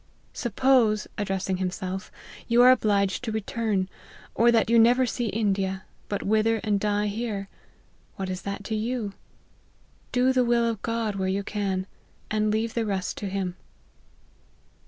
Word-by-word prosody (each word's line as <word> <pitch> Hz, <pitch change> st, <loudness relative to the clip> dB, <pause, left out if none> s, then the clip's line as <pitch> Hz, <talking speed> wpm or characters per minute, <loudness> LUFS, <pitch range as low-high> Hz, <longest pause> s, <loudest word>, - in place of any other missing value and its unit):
Suppose," 240 Hz, -2 st, +2 dB
(addressing 195 Hz, -2 st, -1 dB
himself,) 185 Hz, +1 st, -4 dB, 0.2 s
" -, -, -16 dB
you 235 Hz, +1 st, +5 dB
are 250 Hz, -, +9 dB
obliged 205 Hz, -4 st, +2 dB
to 230 Hz, -, -2 dB
return, 215 Hz, -2 st, -1 dB, 0.5 s
or 235 Hz, +1 st, +4 dB
that 225 Hz, -1 st, +3 dB
you 230 Hz, +1 st, +5 dB
never 245 Hz, +3 st, +5 dB
see 240 Hz, 0 st, -2 dB
India, 195 Hz, -3 st, -1 dB, 0.2 s
but 200 Hz, -, -2 dB
wither 220 Hz, +2 st, +2 dB
and 210 Hz, -2 st, +1 dB
die 210 Hz, 0 st, 0 dB
here, 205 Hz, -2 st, -3 dB, 0.7 s
what 195 Hz, -, -4 dB
is 185 Hz, 0 st, -4 dB
that 200 Hz, 0 st, -5 dB
to 220 Hz, +2 st, -3 dB
you? 220 Hz, -2 st, -2 dB, 1.0 s
Do 255 Hz, +1 st, +3 dB
the 255 Hz, -1 st, +3 dB
will 235 Hz, -1 st, +2 dB
of 225 Hz, -3 st, -2 dB
God 230 Hz, -3 st, -2 dB
where 190 Hz, -1 st, -1 dB
you 195 Hz, +1 st, -1 dB
can, 195 Hz, -2 st, -2 dB, 0.5 s
and 215 Hz, 0 st, +1 dB
leave 220 Hz, +1 st, 0 dB
the 230 Hz, -, 0 dB
rest 195 Hz, -4 st, -2 dB
to 200 Hz, -, -4 dB
him." 190 Hz, -2 st, -2 dB
215 Hz, 155 wpm, -26 LUFS, 195-230 Hz, 1.0 s, are